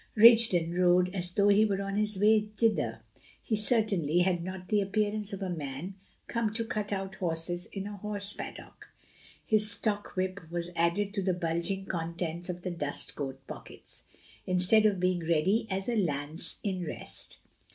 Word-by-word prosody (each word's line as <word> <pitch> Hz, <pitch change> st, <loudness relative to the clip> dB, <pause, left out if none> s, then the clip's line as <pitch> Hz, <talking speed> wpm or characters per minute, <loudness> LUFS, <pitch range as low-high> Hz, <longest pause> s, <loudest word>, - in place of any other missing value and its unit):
Rigden 220 Hz, -7 st, +6 dB
rode 180 Hz, +1 st, +3 dB
as 180 Hz, -2 st, -2 dB
though 200 Hz, +2 st, +3 dB
he 205 Hz, +1 st, +6 dB
were 200 Hz, -3 st, +1 dB
on 195 Hz, 0 st, -3 dB
his 210 Hz, -1 st, +1 dB
way 210 Hz, +1 st, +4 dB
thither; 225 Hz, -2 st, +1 dB, 0.4 s
he 220 Hz, -, -1 dB
certainly 205 Hz, -7 st, +2 dB
had 175 Hz, -2 st, +1 dB
not 185 Hz, 0 st, -7 dB
the 210 Hz, -1 st, +3 dB
appearance 210 Hz, +1 st, -1 dB
of 195 Hz, 0 st, -5 dB
a 190 Hz, -, -2 dB
man 150 Hz, +3 st, -5 dB, 0.3 s
come 230 Hz, -3 st, -1 dB
to 230 Hz, 0 st, 0 dB
cut 210 Hz, -2 st, -3 dB
out 195 Hz, -1 st, -3 dB
horses 175 Hz, 0 st, -2 dB
in 195 Hz, -1 st, -6 dB
a 205 Hz, 0 st, -6 dB
horse 205 Hz, 0 st, -1 dB
paddock. -, -, -9 dB, 0.6 s
His 215 Hz, -1 st, +3 dB
stock 205 Hz, -1 st, -1 dB
whip 185 Hz, +1 st, -1 dB
was 175 Hz, 0 st, -3 dB
added 170 Hz, +5 st, +1 dB
to 200 Hz, -, -1 dB
the 185 Hz, -1 st, 0 dB
bulging 175 Hz, +3 st, -2 dB
contents 170 Hz, 0 st, -3 dB
of 180 Hz, 0 st, -5 dB
the 180 Hz, -, -2 dB
dust 145 Hz, -4 st, 0 dB
coat 135 Hz, -2 st, -5 dB
pockets, -, -, -7 dB, 0.4 s
instead 185 Hz, +4 st, +4 dB
of 200 Hz, -3 st, 0 dB
being 180 Hz, 0 st, +1 dB
ready 170 Hz, +7 st, +1 dB
as 195 Hz, 0 st, -2 dB
a 240 Hz, -, 0 dB
lance 155 Hz, -4 st, -1 dB
in 185 Hz, -3 st, -2 dB
rest. 165 Hz, -, -2 dB
190 Hz, 170 wpm, -30 LUFS, 175-210 Hz, 0.6 s, Rigden